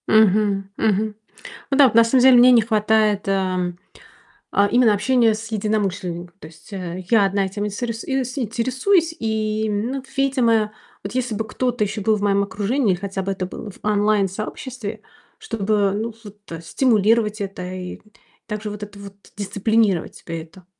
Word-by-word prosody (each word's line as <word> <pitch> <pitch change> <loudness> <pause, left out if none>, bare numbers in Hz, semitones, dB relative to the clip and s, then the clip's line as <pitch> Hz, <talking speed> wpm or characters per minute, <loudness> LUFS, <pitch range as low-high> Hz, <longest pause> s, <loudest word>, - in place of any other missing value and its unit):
Мгм, 205 -2 +3
мгм. 215 0 +1 0.6
Ну 275 - +2
да, 285 - +8
вот, 225 - -3
на 230 - +8
самом 245 +3 +3
деле, 260 -1 +8
мне 245 +1 +8
не 240 -2 +6
хватает, 215 -2 +1
э, 185 -2 0 0.8
а, 200 0 +3
именно 240 -3 +5
общения 230 +2 +3
с 220 +1 -6
единомышленниками. 190 -5 -2
То 155 - -10
есть, 155 +3 -17
э, 185 -1 -5
я 220 -4 +5
одна 195 0 +1
этим 205 +2 -4
интерес 225 +2 -4
ис 265 -1 -2
интересуюсь. 260 - +1
И, 220 -1 -1
ну, 230 +6 -2
видимо, 235 -6 +2 0.3
вот 200 - -6
если 250 -3 -1
бы 220 +1 -2
кто-то 245 +1 -1
ещё 210 +1 -3
был 215 +2 +2
в 205 - -5
моём 200 -1 +2
окружении, 210 +3 0
иль 175 - -5
хотя 195 0 -4
бы 195 +1 -2
это 185 -1 -4
было 205 +3 -8
в 195 - -14
онлайн-сообществе, 210 +2 -1 0.4
чтобы, 210 - 0
ну, 225 +3 -3
вот, 205 -1 -12
э, 165 0 -6
стимулировать 215 +1 +2
это 195 -2 -5
и 185 -1 -7 0.5
также 210 0 -4
вот 210 0 -8
это 205 0 -10
вот 200 0 -10 0.2
дисциплинировать 205 -2 0
себя, 165 -1 -6
это. 170 +3 -15
210 Hz, 170 wpm, -21 LUFS, 195-230 Hz, 0.8 s, да